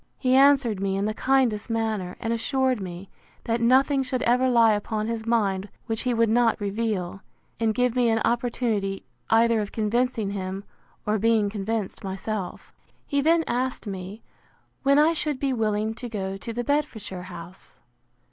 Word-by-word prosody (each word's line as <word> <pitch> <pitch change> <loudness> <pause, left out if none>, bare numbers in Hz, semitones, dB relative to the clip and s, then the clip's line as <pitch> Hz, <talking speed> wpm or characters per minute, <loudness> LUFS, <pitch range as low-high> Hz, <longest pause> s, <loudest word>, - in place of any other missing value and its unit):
He 255 -1 +1
answered 270 -6 +5
me 195 0 -1
in 200 - 0
the 215 - -1
kindest 250 -3 +1
manner; 220 -5 -2
and 230 -1 -1
assured 260 0 0
me, 180 +1 -7 0.4
That 230 0 -1
nothing 270 +3 +4
should 255 -1 -1
ever 250 +2 +3
lie 230 -3 +5
upon 210 +1 -2
his 225 0 -4
mind 200 -4 +1 0.2
which 225 -2 -2
he 250 - 0
would 230 0 +3
not 235 +1 +3
reveal, 200 -3 -2 0.4
and 225 -1 +2
give 250 -1 +1
me 245 -2 +3
an 225 0 +2
opportunity 230 -4 -1 0.2
either 225 0 +4
of 205 - -5
convincing 225 -1 0
him, 190 0 -4 0.4
or 210 0 +1
being 220 -1 +2
convinced 210 0 -3
myself. 195 0 -5 0.3
He 280 -1 0
then 325 +3 +3
asked 255 +1 -2
me, 195 +2 -7 0.6
When 280 +1 +4
I 310 +3 +5
should 300 -3 -1
be 270 0 0
willing 215 -1 0
to 245 +1 -7
go 195 -3 -3
to 215 +4 -6
the 240 +1 -3
Bedfordshire 235 -9 -2
house? 175 +1 -9
225 Hz, 165 wpm, -25 LUFS, 205-250 Hz, 0.6 s, answered